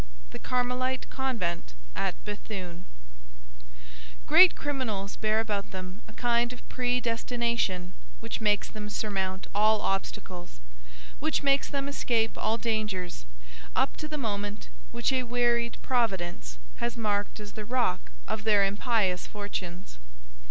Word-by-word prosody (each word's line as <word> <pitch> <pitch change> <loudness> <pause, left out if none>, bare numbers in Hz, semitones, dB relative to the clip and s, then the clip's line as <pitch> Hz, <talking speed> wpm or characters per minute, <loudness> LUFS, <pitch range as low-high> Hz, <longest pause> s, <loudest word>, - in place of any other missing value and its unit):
THE - - -7
CARMELITE 250 +1 0
CONVENT 200 - -2 0.2
AT - - 0
BÉTHUNE 195 -4 -5 1.4
Great 370 - +8
criminals 230 -9 -2
bear 215 0 +2
about 210 -3 -1
them 185 +1 -7
a 215 - -12
kind 240 0 +2
of 250 - -10
predestination 235 -6 0 0.3
which - - -4
makes 210 -1 +3
them 210 -1 -6
surmount 190 -3 -1
all 215 +1 +5
obstacles, 185 - -3 0.6
which - - +1
makes 275 0 +4
them 280 -1 -1
escape 235 -5 +1
all 220 +1 +1
dangers, 210 - -2 0.5
up - - +2
to 305 - -4
the 305 0 -3
moment 205 - -3 0.2
which 120 - +1
a 260 - +3
wearied 240 -1 +2
Providence 180 - 0 0.2
has 235 0 -2
marked 205 -2 0
as 205 -1 -7
the 215 - -6
rock 215 - 0 0.2
of 215 - -2
their 210 -2 +5
impious 200 -2 +1
fortunes. 185 - -5
215 Hz, 125 wpm, -29 LUFS, 195-240 Hz, 1.4 s, Great